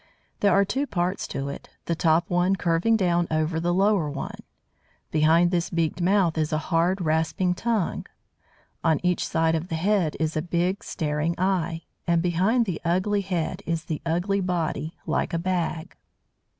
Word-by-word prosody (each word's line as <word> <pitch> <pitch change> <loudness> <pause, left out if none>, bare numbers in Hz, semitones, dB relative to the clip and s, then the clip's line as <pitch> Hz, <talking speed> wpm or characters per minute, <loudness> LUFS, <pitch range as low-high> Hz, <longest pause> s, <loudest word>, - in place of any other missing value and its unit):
There 200 - +3
are 195 +2 +4
two 275 +8 -1
parts 180 -2 -1
to 135 - -4
it, 140 - -8 0.2
the 170 - 0
top 165 +1 +2
one 180 0 +2
curving 175 +5 +2
down 175 -3 +1
over 155 +1 0
the 175 +1 0
lower 190 -3 +2
one. 140 -1 -6 0.7
Behind 160 +3 +4
this 175 -2 0
beaked 165 +1 -1
mouth 180 -3 +2
is 155 -1 0
a 155 - +1
hard, 175 +3 +2
rasping 160 +3 +1
tongue. 215 -1 -1 0.8
On 160 -3 +3
each 180 -1 +1
side 160 0 +1
of 165 +1 -1
the 165 - -3
head 180 -2 +1
is 160 0 -1
a 155 - +1
big, 175 +3 -1
staring 155 +1 -1
eye; 175 -3 0 0.2
and 170 -1 +2
behind 190 +8 +2
the 180 -6 -4
ugly 185 +4 +1
head 180 -1 -2
is 165 -1 -2
the 155 -3 -4
ugly 175 +4 0
body, 165 -3 -2
like - - -1
a - - +2
bag. 175 -1 -2
175 Hz, 170 wpm, -25 LUFS, 160-185 Hz, 0.8 s, are